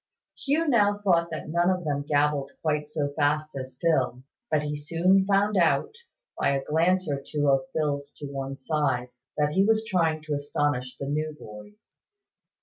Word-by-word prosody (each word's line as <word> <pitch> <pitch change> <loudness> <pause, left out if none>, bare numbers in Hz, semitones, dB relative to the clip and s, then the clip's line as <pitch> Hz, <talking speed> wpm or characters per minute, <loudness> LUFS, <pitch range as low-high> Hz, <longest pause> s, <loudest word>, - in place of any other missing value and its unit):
Hugh 305 +4 0
now 205 -6 +3
thought 175 -5 +2
that 155 -1 -6
none 175 +2 +2
of 185 -1 0
them 145 -2 -1
gabbled 145 -1 0
quite 150 -1 0
so 150 -2 -1
fast 150 0 0
as 130 -1 -7
Phil: 130 -6 +1 0.3
but 150 -1 +1
he 150 0 -3
soon 170 +6 +2
found 205 +1 +2
out, 185 - +2 0.5
by - - +2
a 135 -1 0
glance 170 +5 +1
or 140 -2 -2
two 145 0 -1
of 135 -1 +2
Phil's 145 -2 -2
to 145 - -9
one 135 -1 -5
side, 135 -4 -1 0.3
that 150 0 +2
he 190 +5 +3
was 220 +1 +2
trying 165 -7 0
to 155 -1 -3
astonish 145 -3 -1
the 140 - -5
new 150 +2 -2
boys. 110 - -13
150 Hz, 175 wpm, -26 LUFS, 140-180 Hz, 0.5 s, now